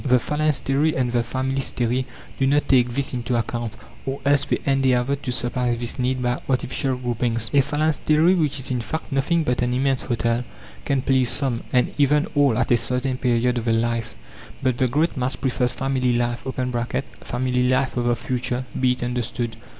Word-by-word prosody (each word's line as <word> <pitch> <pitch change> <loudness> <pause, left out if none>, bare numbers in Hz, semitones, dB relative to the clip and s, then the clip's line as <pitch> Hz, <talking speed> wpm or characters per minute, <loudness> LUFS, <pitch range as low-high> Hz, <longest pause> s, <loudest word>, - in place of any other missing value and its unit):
The 130 -3 +4
phalanstery 150 +2 0
and 125 -2 0
the 120 -1 +2
familystery 130 0 -1 0.3
do 135 - +3
not 145 +2 +2
take 125 -2 +4
this 140 -1 -1
into 125 0 -1
account, 115 -1 -2 0.3
or 135 +1 -4
else 140 0 +3
they - - 0
endeavour 135 -1 +2
to 135 -2 -4
supply 120 0 0
this 120 +2 -4
need 125 0 0
by 120 +1 0
artificial 130 0 0
groupings. 120 -2 -2
A 140 - +6
phalanstery, 155 +3 +2
which 155 -6 +1
is 130 - -3
in 125 -2 0
fact 160 +7 -5
nothing 145 +5 +1
but 125 -5 0
an 125 0 +1
immense 135 0 +1
hotel, 120 0 0 0.4
can 135 -2 0
please 130 -2 +3
some, 130 -5 +1
and 125 -1 +2
even 145 +1 +4
all 140 -6 +3
at - - 0
a 120 - +6
certain 125 +2 -1
period 125 0 +1
of 115 - -6
their 115 -1 +2
life, 115 0 -1 0.5
but 130 -2 +1
the 130 - +3
great 155 +8 +1
mass 125 0 -1
prefers 125 -1 0
family 130 -2 0
life 120 +1 -1 0.7
(family 125 0 0
life 130 +1 +1
of 120 -1 0
the 120 0 +2
future, 125 +1 -2
be 130 -1 +3
it 125 - -6
understood). 120 -1 -2
125 Hz, 185 wpm, -23 LUFS, 120-135 Hz, 0.7 s, A